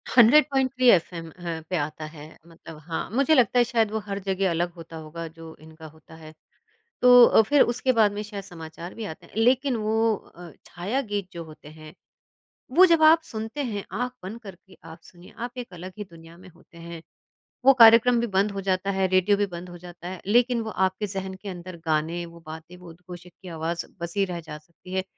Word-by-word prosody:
100.3 260 +1 +4
F 180 -2 +3
am 165 -1 -7
a, 170 -1 -6
पे 185 - -1
आता 155 +1 -4
है, 155 -1 -11 0.2
मतलब 165 -1 -13
हाँ, 165 - -4
मुझे 275 +7 +2
लगता 250 -1 +3
है - - +6
शायद 225 -3 0
वो 220 - -2
हर 200 0 -3
जगह 190 0 0
अलग 175 +1 -1
होता 165 -1 -11
होगा 160 +1 -7
जो 165 0 -12
इनका 160 0 -14
होता 160 +1 -17
है। 155 -1 -13 0.7
तो 245 -1 +8
अ, - - +5
फिर 275 +6 +3
उसके 245 +2 +2
बाद 220 -3 +4
में 205 - -4
शायद 205 -1 -8
समाचार 170 -2 -10
भी 225 - -6
आते 160 - -9
हैं, - - -21
लेकिन 255 +3 +2
वो 220 0 +1
अ, 175 -3 -13
छाया 200 +10 -3
गीत 200 -2 -2
जो 170 -1 -6
होते 155 -2 -14
हैं, 155 0 -13 0.8
वो 365 +8 +7
जब 335 -3 +3
आप 320 +1 +7
सुनते 225 +5 -5
हैं 210 -6 -4
आँख 250 0 -2
बंद 205 +5 -7
करके 190 -3 -14
आप 165 +1 -12
सुनिए, 175 0 -17
आप 245 +2 -6
एक 245 -6 -7
अलग 180 +2 -9
ही 210 - -5
दुनिया 165 0 -15
में 185 +1 -15
होते 170 0 -21
हैं। 170 0 -9 0.6
वो 270 - +8
कार्यक्रम 230 +1 +7
भी 235 - -1
बंद 200 0 +1
हो 195 - -4
जाता 190 0 -1
है, 190 -1 +1
रेडियो 185 +2 +3
भी 205 0 0
बंद 175 -1 -9
हो 175 - -10
जाता 175 0 -10
है 185 -1 -7
लेकिन 240 +3 +3
वो 220 - -5
आपके 190 +1 -1
ज़हन 190 -1 -5
के 195 +2 -10
अंदर 180 -1 -8
गाने, 160 +2 -1
वो 170 0 -14
बातें, 160 +3 -10
वो 180 -1 -14
उद्घोषक 175 +1 -12
की 185 - -10
आवाज़ 165 0 -4 0.2
बसी 170 +4 -1
रह 180 -2 -5
जा 155 -2 -9
सकती 170 +4 -16
है, 190 - -1
185 Hz, 215 wpm, -25 LUFS, 170-225 Hz, 0.8 s, तो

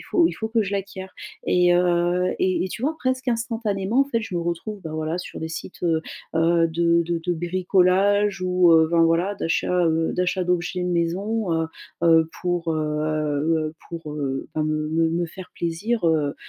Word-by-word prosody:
il - - -10
faut 340 -2 +3
il - - -4
faut 220 - -4
que 225 0 +2
je 200 -1 -4
l'acquière. 195 -1 -5 0.3
Et 180 0 +4
heu, 175 +1 +2
et 185 -1 +1
et - - -3
tu 215 - -7
vois, 310 +4 0
presque 260 0 -1
instantanément, 225 -2 0
en - - +4
fait, 240 -5 -1
je 220 -4 -6
me 175 - 0
retrouve, 175 +5 -4
bah, 160 - -6
voilà, 155 +2 -2
sur 180 - -7
des 160 - -3
sites, 165 +3 -8
heu 165 -2 +2 0.3
heu, 165 +1 +3
de 170 +1 +2
de 170 0 -2
de 180 - +1
bricolage 185 +3 +2
ou, 180 -1 +4
heu, 160 -1 +5
ben 170 -1 +4
voilà, 165 +5 +2
d'achat, 165 -2 -1
heu 160 0 +1
d'achat 180 +1 0
d'objets 180 +1 -1
de 180 - -1
maison, 180 +4 -1
heu 165 0 0 0.4
heu, 165 -1 +5
pour, 175 -2 -1
heu 155 0 -1
pour, 165 -3 -7
heu 135 -3 -3
enfin 155 - 0
me 155 0 -1
me 165 +1 +2
me 170 +1 -1
faire 180 +2 -11
plaisir, 175 +5 -1
heu 150 -3 +1
175 Hz, 195 wpm, -23 LUFS, 165-190 Hz, 0.4 s, heu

